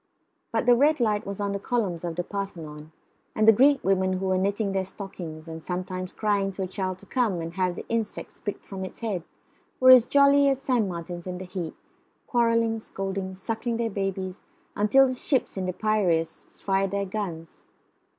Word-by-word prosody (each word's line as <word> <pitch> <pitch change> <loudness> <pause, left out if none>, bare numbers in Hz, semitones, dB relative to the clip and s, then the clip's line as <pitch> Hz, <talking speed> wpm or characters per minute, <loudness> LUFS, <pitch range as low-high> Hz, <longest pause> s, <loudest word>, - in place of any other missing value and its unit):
But 225 0 0
the 245 - +7
red 295 +4 +3
light 210 -4 +1
was 200 0 -5
on 200 -1 -1
the 200 - -2
columns 200 -7 -1
of 170 -1 -3
the 175 - -1
Parthenon, 160 -6 -6 0.4
and 215 0 +2
the - - +11
Greek 270 +5 +4
women 190 -1 +2
who 185 +1 -2
were 190 0 +2
knitting 200 +1 0
their 190 -1 0
stockings 175 -5 -8
and 160 0 -7
sometimes 185 +1 -4
crying 205 -2 0
to 190 - -3
a - - -2
child 185 -1 -3
to 200 - -15
come 220 -5 0
and 165 0 -5
have 180 -1 0
the - - -7
insects 225 -2 -3
picked 205 - -5
from 190 -1 -6
its 190 - -8
head 210 -6 -2 0.6
were 255 0 +8
as 250 -2 +8
jolly 280 0 +5
as 270 -1 +1
sand 250 -7 +1
martins 175 0 -6
in 180 0 -4
the 185 - -7
heat, 180 -3 -5 0.5
quarrelling, 230 -2 +2
scolding, 195 -2 -4
suckling 225 +4 -3
their 230 -1 -1
babies, 195 -1 -3 0.3
until 215 +7 +5
the 255 - -1
ships 260 +1 0
in 190 -2 -2
the - - 0
Piraeus 185 -6 0
fired 195 0 +1
their 200 +1 -1
guns. 185 -5 -6
195 Hz, 195 wpm, -26 LUFS, 185-225 Hz, 0.6 s, the